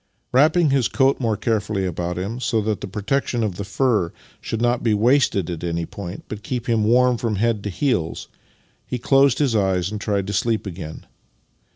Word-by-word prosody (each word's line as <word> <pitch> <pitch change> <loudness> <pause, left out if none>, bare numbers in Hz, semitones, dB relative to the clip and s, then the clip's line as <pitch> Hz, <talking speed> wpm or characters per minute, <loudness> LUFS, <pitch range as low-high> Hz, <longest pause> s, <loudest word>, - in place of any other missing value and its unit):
Wrapping 155 +4 +4
his 135 -4 +3
coat 135 0 +2
more 115 -4 0
carefully 105 -3 -1
about 90 0 -3
him, 100 +7 -3
so 115 -3 0
that 105 -1 -2
the - - -4
protection 115 +4 -1
of 100 -5 -2
the 100 - -3
fur 105 -4 +1 0.3
should 115 - -3
not 120 +1 +1
be 110 -3 +2
wasted 115 - +3
at 85 -1 -6
an}' 85 -1 -2
point, 95 0 -8
but 105 -1 -7
keep 120 +2 -4
him 115 -2 +2
warm 125 +2 +4
from 115 -3 -1
head 110 0 0
to - - -1
heels, 95 - -1 0.6
he 125 - -2
closed 135 +1 +4
his 135 -6 +1
eyes 95 -2 +1
and 105 -1 -5
tried 100 -3 0
to 100 - -4
sleep 115 -1 0
again. 85 -4 -7
110 Hz, 195 wpm, -22 LUFS, 95-125 Hz, 0.6 s, Wrapping